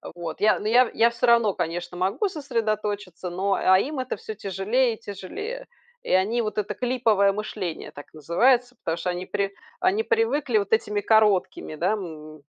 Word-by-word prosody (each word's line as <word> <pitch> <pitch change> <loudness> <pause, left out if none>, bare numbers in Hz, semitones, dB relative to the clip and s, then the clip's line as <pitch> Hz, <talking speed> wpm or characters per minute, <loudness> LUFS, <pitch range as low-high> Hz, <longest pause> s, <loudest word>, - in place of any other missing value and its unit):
Вот. 170 -2 -6
Я, 215 +1 +4
ну, - - -8
я 245 +2 +5
я 230 +1 +4
всё 235 +1 -1
равно, 235 -4 +4
конечно, 175 +1 -4
могу 190 - 0
сосредоточиться, 215 - -3
но, 190 +3 0
а 185 -1 +4
им 285 +6 -3
это 255 -1 -3
всё 220 - -7
тяжелее 215 +6 0
и - - -21
тяжелее. 420 - -7 0.4
И - - -5
они 205 +6 +2
вот 215 -2 -4
это 210 -1 -1
клиповое 230 -6 +2
мышление 195 -4 -5
так 145 - -12
называется, 245 - +2
потому 165 -7 -3
что 175 +2 -3
они 180 +1 -3
при 200 +1 -2 0.3
они 375 +4 +2
привыкли 305 - +1
вот 200 0 -1
этими 210 -2 +1
короткими, 205 -6 +2
да, 180 +7 +1
м, 155 -7 -8
210 Hz, 175 wpm, -25 LUFS, 185-245 Hz, 0.4 s, я